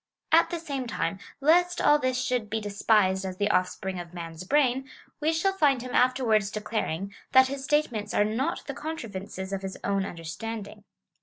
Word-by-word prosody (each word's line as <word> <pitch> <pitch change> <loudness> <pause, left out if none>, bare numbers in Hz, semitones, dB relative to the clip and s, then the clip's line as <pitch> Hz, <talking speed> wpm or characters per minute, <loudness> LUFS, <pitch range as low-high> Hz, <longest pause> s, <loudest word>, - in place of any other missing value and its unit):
At 330 +1 +6
the 345 - -2
same 280 -6 -4
time, 195 -3 -2 0.2
lest 350 +4 +4
all 295 0 +5
this 255 -2 0
should 250 -4 -1
be 220 +1 -1
despised 200 -2 +2
as 185 -1 -5
the 205 +1 +1
offspring 185 0 -1
of 175 0 -9
man's 165 0 -7
brain, 265 +3 +2 0.3
we 310 +1 +2
shall 345 +4 +1
find 280 -9 +2
him 255 - -7
afterwards 245 -5 +3
declaring, 205 -3 -3 0.2
that 260 0 +7
his 275 0 -5
statements 250 -8 0
are 205 - +3
not 255 +10 -2
the 275 - -4
contrivances 205 -11 -6
of 195 - -2
his 190 -1 -5
own 200 -1 +1
under 170 -4 -7
standing. 210 +4 -6
225 Hz, 180 wpm, -27 LUFS, 195-275 Hz, 0.3 s, that